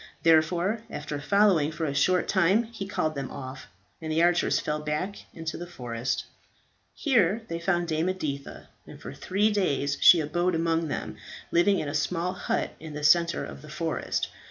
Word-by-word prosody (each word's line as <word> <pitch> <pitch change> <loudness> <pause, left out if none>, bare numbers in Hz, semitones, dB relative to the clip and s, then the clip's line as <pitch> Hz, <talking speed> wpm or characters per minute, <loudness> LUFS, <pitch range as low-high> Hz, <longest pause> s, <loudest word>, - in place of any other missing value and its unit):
Therefore 170 +6 +3
after 150 -5 -5
following 180 -2 +3
for 160 0 -3
a 140 - -2
short 180 +6 +2
time 190 +4 +3
he 220 -4 -7
called 160 -6 -1
them 140 -3 -4
off, 130 0 -8 0.3
and 160 -1 -4
the 160 +2 +2
archers 175 0 +3
fell 150 0 -2
back 150 +7 -3
into 160 -1 -5
the 175 - -7
forest. 125 -5 -3 0.7
Here 225 - +2
they 165 - -3
found 175 0 0
Dame 160 +2 0
Editha, 145 -7 -5 0.2
and - - -11
for - - -8
three 205 +3 +1
days 145 -8 0
she 175 - +8
abode 175 +4 0
among 165 0 0
them, - - -4 0.3
living 195 +4 +4
in 155 - -2
a 145 - -4
small 170 +4 -1
hut 185 - -2
in 155 -1 -9
the 150 - -5
centre 170 +2 +4
of 70 0 -10
the - - -12
forest. - - -2
165 Hz, 180 wpm, -27 LUFS, 150-185 Hz, 0.7 s, she